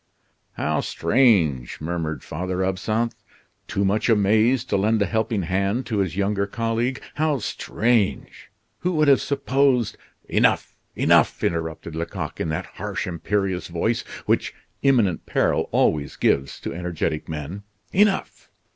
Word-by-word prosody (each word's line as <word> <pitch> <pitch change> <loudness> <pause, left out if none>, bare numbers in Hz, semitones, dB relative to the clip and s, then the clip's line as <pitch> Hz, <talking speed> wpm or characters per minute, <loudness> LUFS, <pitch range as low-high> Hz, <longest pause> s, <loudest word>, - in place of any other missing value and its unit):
"How - - -1
strange," 90 - +2
murmured 80 -1 -3
Father 90 +1 -3
Absinthe, 110 +5 -1 0.5
too 100 - 0
much 105 +5 +1
amazed 110 +3 +3
to - - +2
lend 110 +3 +2
a 100 - +3
helping 110 -1 -1
hand 100 +8 0
to 110 -3 -1
his 95 -3 -1
younger 100 0 0
colleague. 115 +4 -1 0.2
"How 155 -1 +2
strange! 115 -2 -1 0.3
Who 180 +2 -1
would 155 -2 +3
have 140 -1 +6
supposed 135 -3 +1 0.2
" - - -45
"Enough! - - +2 0.2
enough!" - - +3
interrupted 80 -1 -2
Lecoq, 85 0 -4
in 80 - -1
that 80 - -2 0.2
harsh, - - -3
imperious 95 +2 -1
voice, 100 +7 0 0.2
which - - 0 0.3
imminent 115 - +2
peril - - +1
always 70 -2 +1
gives 70 0 +1
to - - -4
energetic 85 -3 -3
men. 80 +5 -5 0.3
"Enough! 200 0 +1
100 Hz, 135 wpm, -23 LUFS, 85-120 Hz, 0.5 s, have